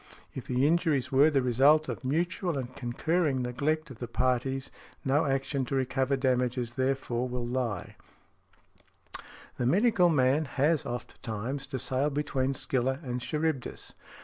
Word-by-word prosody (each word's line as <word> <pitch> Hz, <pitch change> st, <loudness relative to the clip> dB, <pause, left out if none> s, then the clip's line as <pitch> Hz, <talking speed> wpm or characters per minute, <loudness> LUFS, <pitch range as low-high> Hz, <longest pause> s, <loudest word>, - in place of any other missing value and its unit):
If 130 Hz, -, -7 dB
the 125 Hz, +2 st, +2 dB
injuries 160 Hz, -4 st, +2 dB
were 140 Hz, +3 st, +6 dB
|71| -, -, -6 dB
the 135 Hz, -, +3 dB
result 140 Hz, +6 st, +4 dB
of -, -, -5 dB
mutual 170 Hz, +4 st, -1 dB
and 130 Hz, -1 st, -5 dB
concurring 140 Hz, +2 st, 0 dB
neglect 150 Hz, +5 st, -1 dB
of 120 Hz, -, -11 dB
the 120 Hz, -, -4 dB
parties 130 Hz, +2 st, -1 dB, 0.3 s
no 140 Hz, +4 st, +2 dB
action 135 Hz, 0 st, 0 dB
to 135 Hz, -, -3 dB
recover 135 Hz, +1 st, 0 dB
damages 125 Hz, -2 st, 0 dB
therefor 130 Hz, -1 st, -1 dB
will 125 Hz, -1 st, -3 dB
lie. 120 Hz, -6 st, -3 dB, 1.6 s
The 120 Hz, -, 0 dB
medical 190 Hz, -, +4 dB
man 145 Hz, 0 st, +3 dB
has 145 Hz, +2 st, +1 dB
ofttimes 120 Hz, +2 st, -5 dB
to 135 Hz, -2 st, -4 dB
sail 130 Hz, +3 st, 0 dB
between 135 Hz, -2 st, -1 dB
Scylla 130 Hz, 0 st, 0 dB
and 125 Hz, -2 st, -3 dB
Charybdis. 150 Hz, 0 st, -3 dB
135 Hz, 145 wpm, -29 LUFS, 125-150 Hz, 1.6 s, were